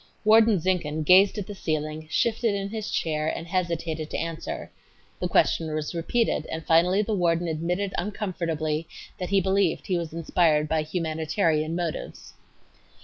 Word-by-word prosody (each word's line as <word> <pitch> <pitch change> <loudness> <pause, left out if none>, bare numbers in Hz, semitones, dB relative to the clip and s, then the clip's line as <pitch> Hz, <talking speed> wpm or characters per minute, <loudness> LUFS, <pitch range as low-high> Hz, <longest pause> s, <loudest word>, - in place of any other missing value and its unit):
Warden 220 -1 +6
Zinkhan 160 -3 -1
gazed 190 +6 +6
at 205 - -3
the 205 - -7
ceiling, 155 -3 -3
shifted 225 +3 +1
in 195 0 -3
his 220 0 -4
chair 155 -1 -1
and 165 - -3
hesitated 170 -3 -2
to - - -3
answer. 165 -1 -5 0.5
The - - -1
question 160 -1 +2
was 155 +1 -3
repeated, 170 +1 0
and 160 0 -5
finally 180 +5 +4
the 215 - -2
warden 175 -2 +1
admitted 175 +5 -2
uncomfortably 165 -5 -2 0.3
that 180 - -3
he 200 0 +4
believed 190 -2 +1
he 180 -2 0
was 165 -2 -5
inspired 160 -2 +2
by 160 0 +1
"humanitarian 160 0 -1
motives." 170 -3 -5
170 Hz, 150 wpm, -26 LUFS, 155-195 Hz, 0.5 s, Warden